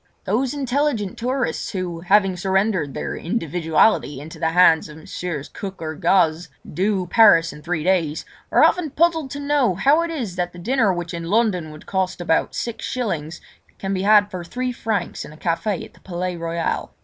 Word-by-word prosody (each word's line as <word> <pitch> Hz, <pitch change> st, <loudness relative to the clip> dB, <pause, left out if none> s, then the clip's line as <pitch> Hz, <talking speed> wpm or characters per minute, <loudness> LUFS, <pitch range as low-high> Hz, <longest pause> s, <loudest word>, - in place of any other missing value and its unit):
Those 245 Hz, +8 st, 0 dB
intelligent 265 Hz, -6 st, -1 dB
tourists 250 Hz, 0 st, -2 dB
who, 180 Hz, -3 st, -3 dB
having 195 Hz, +2 st, +3 dB
surrendered 190 Hz, -4 st, 0 dB
their -, -, -3 dB
individuality 165 Hz, -, +1 dB
into 155 Hz, +3 st, -10 dB
the 160 Hz, -, +1 dB
hands 165 Hz, -2 st, +4 dB
of 150 Hz, -, -11 dB
Messrs. 160 Hz, -2 st, -5 dB
Cook 195 Hz, -1 st, -7 dB
or 160 Hz, -1 st, -4 dB
Gaze, 165 Hz, 0 st, +2 dB, 0.2 s
"do" 190 Hz, +2 st, 0 dB
Paris 175 Hz, -6 st, +5 dB
in 150 Hz, -, -12 dB
three 165 Hz, -1 st, -2 dB
days, 170 Hz, -4 st, +1 dB, 0.3 s
are -, -, +5 dB
often 355 Hz, -4 st, +3 dB
puzzled 320 Hz, 0 st, +1 dB
to 280 Hz, -, -6 dB
know 285 Hz, -8 st, +1 dB
how 285 Hz, -, +4 dB
it 335 Hz, -, -2 dB
is 240 Hz, -, -4 dB
that 175 Hz, -1 st, -2 dB
the -, -, -12 dB
dinner 225 Hz, +3 st, +2 dB
which 175 Hz, -1 st, -4 dB
in 170 Hz, 0 st, -5 dB
London 190 Hz, -4 st, +1 dB
would 155 Hz, +1 st, -12 dB
cost 185 Hz, -1 st, -1 dB
about 170 Hz, -2 st, 0 dB
six 235 Hz, -2 st, -4 dB
shillings, 170 Hz, -11 st, -3 dB, 0.4 s
can 195 Hz, 0 st, -3 dB
be 185 Hz, -, -1 dB
had 205 Hz, 0 st, +5 dB
for 180 Hz, -2 st, -5 dB
three 250 Hz, +8 st, -3 dB
francs 220 Hz, -5 st, -3 dB
in -, -, -11 dB
a -, -, -14 dB
café 175 Hz, +4 st, -1 dB
in -, -, -15 dB
the -, -, -21 dB
Palais 180 Hz, 0 st, -4 dB
Royal. 165 Hz, 0 st, -3 dB
185 Hz, 185 wpm, -22 LUFS, 165-225 Hz, 0.4 s, Paris